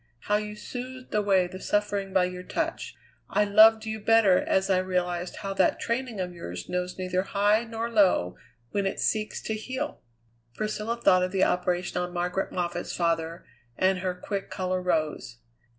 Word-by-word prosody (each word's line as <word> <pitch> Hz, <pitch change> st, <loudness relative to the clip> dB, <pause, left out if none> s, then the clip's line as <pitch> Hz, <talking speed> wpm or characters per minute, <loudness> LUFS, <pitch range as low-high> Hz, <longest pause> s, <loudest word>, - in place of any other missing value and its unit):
How 210 Hz, +7 st, +1 dB
you 210 Hz, 0 st, -5 dB
soothed 255 Hz, +4 st, -8 dB
away 200 Hz, -3 st, +3 dB
the 185 Hz, +1 st, -8 dB
suffering 205 Hz, -1 st, -1 dB
by 185 Hz, -1 st, +3 dB
your 180 Hz, 0 st, -5 dB
touch. 180 Hz, -, -3 dB, 0.3 s
I 205 Hz, +2 st, +3 dB
loved 220 Hz, +2 st, +6 dB
you 220 Hz, 0 st, -3 dB
better 215 Hz, -3 st, +5 dB
as 190 Hz, 0 st, +1 dB
I 190 Hz, -2 st, +3 dB
realized 180 Hz, -1 st, -2 dB
how 195 Hz, 0 st, -3 dB
that -, -, +2 dB
training 235 Hz, -2 st, -2 dB
of 180 Hz, -1 st, -3 dB
yours 90 Hz, -, -7 dB
knows 180 Hz, 0 st, -3 dB
neither 185 Hz, 0 st, 0 dB
high 205 Hz, +3 st, +2 dB
nor 225 Hz, 0 st, -3 dB
low 190 Hz, -, +3 dB, 0.4 s
when 200 Hz, -1 st, 0 dB
it -, -, -3 dB
seeks 215 Hz, -1 st, -1 dB
to 220 Hz, -, -2 dB
heal." 260 Hz, +7 st, -4 dB, 0.5 s
Priscilla 215 Hz, +2 st, -2 dB
thought 185 Hz, -5 st, +5 dB
of 185 Hz, 0 st, 0 dB
the 190 Hz, -1 st, +2 dB
operation 180 Hz, 0 st, 0 dB
on 180 Hz, 0 st, -4 dB
Margaret 180 Hz, +2 st, -1 dB
Moffatt's 175 Hz, -1 st, -3 dB
father, 165 Hz, 0 st, -1 dB, 0.3 s
and 185 Hz, 0 st, +2 dB
her 185 Hz, -1 st, -2 dB
quick 195 Hz, +2 st, -4 dB
colour 185 Hz, -1 st, -2 dB
rose. 155 Hz, -9 st, -1 dB
190 Hz, 170 wpm, -27 LUFS, 180-215 Hz, 0.5 s, loved